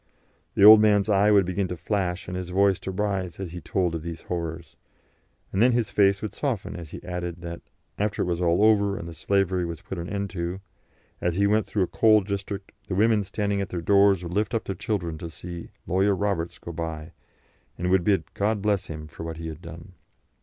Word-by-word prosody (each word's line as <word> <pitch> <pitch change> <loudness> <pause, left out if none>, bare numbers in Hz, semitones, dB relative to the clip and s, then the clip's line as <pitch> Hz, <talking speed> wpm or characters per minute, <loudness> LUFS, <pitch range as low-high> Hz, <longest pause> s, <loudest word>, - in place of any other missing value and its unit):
The - - +3
old 110 0 +11
man's 105 -1 +3
eye 100 0 +4
would 100 -3 +5
begin 95 +2 -1
to 90 - -5
flash 95 -1 -2
and 90 - -5
his 90 -1 -4
voice 95 +1 +3
to - - -6
rise 95 -2 -2
as 95 -4 -5
he 90 0 -7
told 90 -6 0
of 80 - -3
these 85 0 -6
horrors, 85 -2 -5 0.8
and 95 - +1
then 125 +1 +5
his 115 -2 0
face 100 -1 +3
would 105 -1 -4
soften 125 -8 -3
as 85 -3 -8
he - - -9
added 90 -1 -5
that, 85 -1 -6 0.4
after 105 0 0
it - - -2
was 90 0 -1
all 85 +3 +3
over 100 -2 +4
and 85 - -6
the 85 - -7
slavery 95 +2 +1
was 85 -2 -5
put 95 - -6
an 85 +2 -5
end 100 -2 -3
to, 85 +1 -3 0.6
as 85 -1 0
he 100 +2 +2
went 105 +2 +2
through 100 - 0
a - - -1
coal 110 -1 +4
district 100 0 -5 0.2
the 95 - -2
women 110 +1 +3
standing 100 +1 -1
at 95 - -4
their 90 - -3
doors 100 +1 +4
would 85 0 -5
lift 105 +4 0
up 115 - 0
their 95 - -3
children 85 -4 -3
to 85 - -6
see 85 +2 -8 0.2
"Lawyer 95 +2 +2
Roberts" 95 -4 -2
go 85 - -8
by, 80 -1 -5 0.7
and 90 +1 -1
would 95 -2 +4
bid 90 -5 +1
"God 105 +1 0
bless 100 -1 0
him" 75 -1 -7
for 75 - -11
what 80 -1 -5
he 80 0 -5
had 80 +1 -9
done. 85 +2 -10
95 Hz, 225 wpm, -25 LUFS, 85-100 Hz, 0.8 s, old